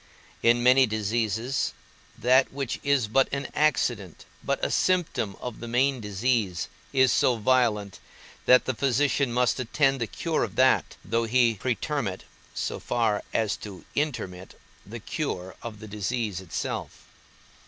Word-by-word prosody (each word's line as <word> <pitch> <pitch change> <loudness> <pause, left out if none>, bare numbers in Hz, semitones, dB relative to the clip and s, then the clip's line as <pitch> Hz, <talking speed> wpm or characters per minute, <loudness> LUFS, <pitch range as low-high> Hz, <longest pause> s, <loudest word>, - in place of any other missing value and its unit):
In 120 +1 +4
many 130 +1 +6
diseases, 110 +3 -1 0.4
that 130 +2 +4
which 135 -2 -3
is 140 -5 +2
but 130 +5 +3
an 140 0 -3
accident, 120 - 0 0.2
but - - 0
a - - -2
symptom 175 - +1
of 125 -3 -6
the 120 - -7
main 130 +2 +1
disease, 105 -3 -1 0.2
is 130 -2 +4
so 125 - +3
violent, 110 -4 +1 0.5
that 125 - +6
the 130 - 0
physician 135 +1 +1
must 125 +1 +1
attend 135 +2 +1
the 115 - 0
cure - - -1
of - - -5
that, - - +3
though 115 +5 0
he 120 0 +3
pretermit 120 -5 -2 0.3
(so - - -3
far 110 -3 0
as 110 -3 0
to 100 -3 -10
intermit) 95 -11 -3 0.3
the - - -7
cure 90 +1 -4
of 110 -3 -7
the 110 - -9
disease 105 -1 -3
itself. 90 -4 -5
120 Hz, 145 wpm, -26 LUFS, 105-130 Hz, 0.5 s, many